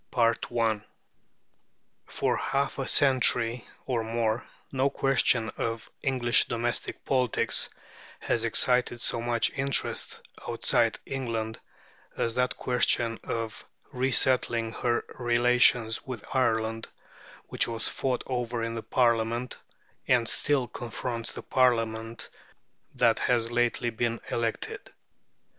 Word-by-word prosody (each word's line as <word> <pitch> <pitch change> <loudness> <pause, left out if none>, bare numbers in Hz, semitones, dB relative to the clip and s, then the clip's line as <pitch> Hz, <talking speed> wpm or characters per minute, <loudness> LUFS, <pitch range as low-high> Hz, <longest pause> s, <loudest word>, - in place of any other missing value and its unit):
P. 115 -1 +1 1.3
For - - 0
half 140 0 -1
a 135 - -2
century 125 -3 +3 0.2
or 120 -3 -1
more 115 0 -1 0.2
no 135 +1 +2
question 125 -4 +2
of 115 -1 -3
English 125 -4 +2
domestic 120 0 -3
politics 130 -3 +3 0.5
has 115 - 0
excited 125 +1 +2
so 115 - -1
much 120 -1 +1
interest 135 0 -1 0.2
outside - - +2
England 115 -4 -3 0.6
as 115 - 0
that 125 +1 0
question 120 -2 +1
of 115 -2 -4 0.3
resettling 125 -3 +2
her 120 -1 0
relations 120 -1 +3
with 125 -5 -7
Ireland, 115 -3 +1 0.6
which - - +1
was 115 -1 -2
fought 130 -2 -1
over 120 -2 -2
in 115 0 -2
the 115 - -4
last - - -29
Parliament, 120 0 +1 0.5
and 120 -3 +3
still 140 -1 0
confronts 115 0 -5
the - - -8
Parliament 115 -3 0 0.6
that - - +3
has 120 -1 +1
lately 120 0 +1
been 115 +1 -1
elected. 115 -1 -3
120 Hz, 110 wpm, -28 LUFS, 115-125 Hz, 1.3 s, century